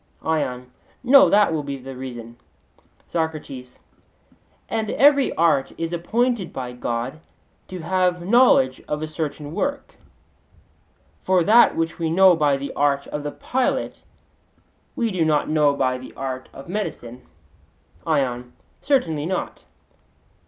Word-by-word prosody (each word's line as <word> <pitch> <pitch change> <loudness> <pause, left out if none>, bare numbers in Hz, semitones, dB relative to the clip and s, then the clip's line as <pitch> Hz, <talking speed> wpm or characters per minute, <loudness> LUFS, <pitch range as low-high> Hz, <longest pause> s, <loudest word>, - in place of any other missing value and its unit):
ION: 130 -6 -2 0.3
No, 270 +2 +7
that 205 -4 +4
will 155 - -1
be 140 -1 -5
the 135 0 -9
reason. 120 -2 -8 0.7
SOCRATES: 155 -6 -5 0.9
And 220 -1 -2
every 280 -1 +4
art 150 -5 +2
is 165 +1 -3
appointed 225 +3 -1
by 125 -2 -5
God 125 +3 -4 0.5
to 185 -2 -7
have 180 0 0
knowledge 200 - +4
of 150 +1 -3
a - - -3
certain 150 -1 -5
work; 280 +6 -3 1.3
for 185 -2 +3
that 225 +6 +5
which 165 +1 -2
we 165 -1 -1
know 185 +2 +6
by 145 -3 +2
the 140 +1 -6
art 140 -1 +1
of 150 - -4
the 145 0 -4
pilot 255 - -2 0.9
we 235 -5 -1
do 180 -3 0
not 155 -2 +1
know 150 -2 +3
by 130 -2 0
the 130 - -12
art 130 -1 -5
of 135 - -12
medicine? 130 - -5 0.9
ION: 125 -5 -1 0.3
Certainly 165 - 0
not. 185 - -4
155 Hz, 130 wpm, -22 LUFS, 135-185 Hz, 1.3 s, No